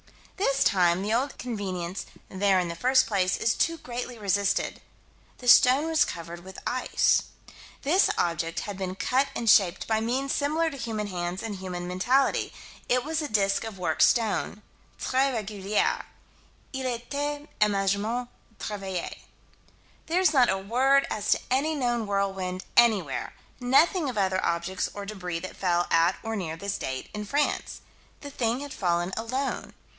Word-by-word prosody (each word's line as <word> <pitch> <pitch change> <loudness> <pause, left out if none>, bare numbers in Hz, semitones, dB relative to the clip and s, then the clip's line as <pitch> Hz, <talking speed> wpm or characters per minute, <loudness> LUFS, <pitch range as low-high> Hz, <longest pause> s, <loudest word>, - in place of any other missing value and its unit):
This 275 -8 +2
time 180 -1 +3
the 210 +2 0
old 265 +4 0
convenience 190 -6 -4 0.2
"there 195 0 +2
in 175 -1 -1
the 170 - -4
first 255 +7 +4
place" 190 -4 +1
is 225 - +2
too 330 -1 0
greatly 245 -2 -6
resisted 200 -1 0 0.6
the 245 - -9
stone 255 +4 +7
was 320 -2 +3
covered 170 +1 -7
with 190 0 -11
ice. 255 +1 +2 0.6
This 345 +8 +4
object 165 -1 -1
had 205 -2 -6
been 185 -1 -3
cut 260 +7 +1
and 235 - -3
shaped 195 -4 +4
by 220 -1 +2
means 260 +4 -1
similar 315 +3 +1
to 275 - -8
human 225 -4 -3
hands 175 -1 -4
and 220 -3 -4
human 180 -1 -5
mentality. 245 +10 +1 0.4
It 250 0 +3
was 315 +2 -1
a 300 - -2
disk 195 -4 +1
of 220 -3 -7
worked 160 -4 -1
stone 215 -2 +2 0.3
"tres 265 +1 +1
regulier." 205 -1 -1 0.7
"Il 265 -1 -2
a 245 -2 -1
été 290 +4 -4
assurement 210 +4 +1 0.3
travaillé." 195 -4 -4 0.9
There's 345 0 +3
not 255 -4 +5
a 190 - +2
word 260 +8 +3
as 210 -1 -2
to - - -2
any 295 +5 +1
known 240 -5 0
whirlwind 195 -2 -2
anywhere: 210 - +3 0.2
nothing 280 +5 +3
of 245 - -5
other 190 -1 +1
objects 170 +3 -1
or 205 -1 -5
débris 180 -5 -5
that 185 - -7
fell 175 -2 +1
at 165 +2 +4
or 225 0 -3
near 165 -5 -4
this 200 +3 -3
date, 130 0 -4
in 210 0 -4
France. 285 +7 -1 0.4
The 285 - -8
thing 240 0 -1
had 285 -1 -7
fallen 175 0 0
alone. 255 +5 -3
215 Hz, 160 wpm, -27 LUFS, 185-260 Hz, 0.9 s, stone